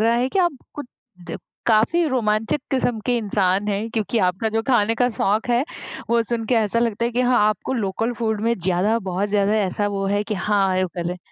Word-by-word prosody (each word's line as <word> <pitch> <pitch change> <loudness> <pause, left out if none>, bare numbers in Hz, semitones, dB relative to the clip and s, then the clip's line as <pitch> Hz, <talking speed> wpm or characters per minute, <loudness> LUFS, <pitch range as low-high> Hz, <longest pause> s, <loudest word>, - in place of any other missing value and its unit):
रहा 230 +1 +3
है 245 +2 +1
कि 385 - -2
आप 345 -6 +2 0.2
कुछ 290 -3 -6 0.8
काफ़ी 230 +10 +3
रोमांचक 220 -1 0
किस्म 245 -4 0
के 245 -1 +2
इंसान 200 -2 +1
हैं, 205 +2 -1
क्योंकि 225 +1 -1
आपका 185 +5 -1
जो 225 +1 -1
खाने 225 -3 +3
का 245 +2 +2
शौक 210 +4 0
है 240 +3 +2 0.5
वो 235 0 +3
सुन 230 0 -3
के 245 - +2
ऐसा 225 0 +1
लगता 230 -1 0
है 235 - 0
कि 245 - 0
हाँ, 250 0 +3
आपको 215 +4 -2
लोकल 225 +1 -1
फूड 220 -3 -1
में 230 +2 +1
ज़्यादा, 185 +5 +1
बहुत 190 -1 -2
ज़्यादा 205 0 +2
ऐसा 205 0 0
वो 200 -1 -2
है 205 +1 +1
कि 215 - -3
हाँ, 195 -1 +1
ये 185 - +2
भी - - -4
कर - - -3
ले। 180 +1 -4
220 Hz, 225 wpm, -22 LUFS, 200-235 Hz, 0.8 s, रहा